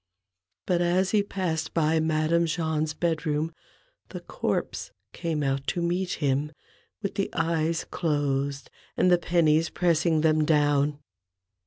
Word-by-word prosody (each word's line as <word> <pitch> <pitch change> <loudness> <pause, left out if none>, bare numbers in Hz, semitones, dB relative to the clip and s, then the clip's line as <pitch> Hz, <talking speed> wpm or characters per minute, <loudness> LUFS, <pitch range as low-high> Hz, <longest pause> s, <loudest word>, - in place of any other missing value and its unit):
But 175 -2 +1
as 180 +2 +2
he 210 - +4
passed 175 -6 -3
by 160 0 +2
Madame 160 +2 +1
Jahn's 155 -2 -1
bed 165 -3 -1
room 155 +2 -1 0.6
the - - -6
corpse - - -3 0.2
came 160 -3 -2
out 135 0 -1
to 175 - -1
meet 180 +2 -1
him, 145 +1 -1 0.5
with 200 - -2
the 195 - -1
eyes 165 0 0
closed 140 -3 -2 0.3
and 180 - +4
the 175 - +5
pennies 165 -2 +2
pressing 165 -2 +2
them 155 -1 +3
down. 145 -1 +2
160 Hz, 135 wpm, -26 LUFS, 150-170 Hz, 0.6 s, the